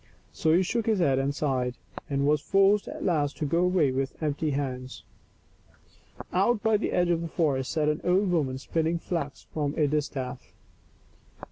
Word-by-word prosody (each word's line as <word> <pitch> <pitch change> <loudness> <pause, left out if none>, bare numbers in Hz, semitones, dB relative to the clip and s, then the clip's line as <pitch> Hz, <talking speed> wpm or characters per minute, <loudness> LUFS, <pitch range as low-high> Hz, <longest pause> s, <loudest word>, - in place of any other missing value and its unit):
So 160 - +1
he 175 +4 +4
shook 230 +4 -1
his 220 -2 +3
head 140 -7 +2
and 140 +1 -1
sighed, 130 -5 -1 0.3
and 140 -1 0
was 150 0 +3
forced 195 +3 +3
at - - -6
last 150 -5 0
to 155 - -2
go 165 +4 +1
away 180 -6 +3
with 135 +1 -2
empty 155 0 -1
hands. 130 -3 -4 1.3
Out 205 +4 +2
by 220 -1 +3
the 205 - -2
edge 175 -1 +2
of 165 -1 +1
the 170 - -3
forest 145 -6 0
sat 155 -2 0
an 150 0 0
old 185 +2 +2
woman 140 -7 0
spinning 165 +4 -1
flax 165 -5 -4
from 145 -2 -1
a 150 - +3
distaff. 135 -4 -3
150 Hz, 175 wpm, -27 LUFS, 140-180 Hz, 1.3 s, he